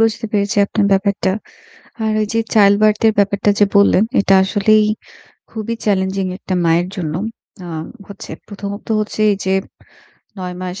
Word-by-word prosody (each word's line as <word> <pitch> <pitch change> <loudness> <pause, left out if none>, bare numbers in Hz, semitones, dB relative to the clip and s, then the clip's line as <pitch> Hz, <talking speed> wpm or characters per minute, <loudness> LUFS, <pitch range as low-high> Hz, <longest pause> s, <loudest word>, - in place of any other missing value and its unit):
বুঝতে 225 0 +1
পেরেছি 205 +1 0
আপনার 205 0 0
ব্যাপারটা। 195 -1 +1 0.7
আর 220 - 0
এইযে 225 +2 -1
childbirth 210 0 +4
এর 220 - +3
ব্যাপারটা 200 0 +1
যে 205 - +6
বললেন, 200 0 +5 0.2
এটা 195 - +3
আসলেই 210 +2 +3 0.6
খুবই 220 +1 -4
চ্যালেঞ্জিং 190 -1 0
একটা 190 - -5
মায়ের 170 +2 +2
জন্য। 165 -6 -3 0.5
আ - - -8 0.4
হচ্ছে 200 -4 -10 0.2
প্রথমত 205 0 -7
হচ্ছে 215 0 -3
এইযে 190 -1 -2 0.9
৯ 180 -1 -5
মাস 185 +1 -5
200 Hz, 140 wpm, -17 LUFS, 190-215 Hz, 0.9 s, যে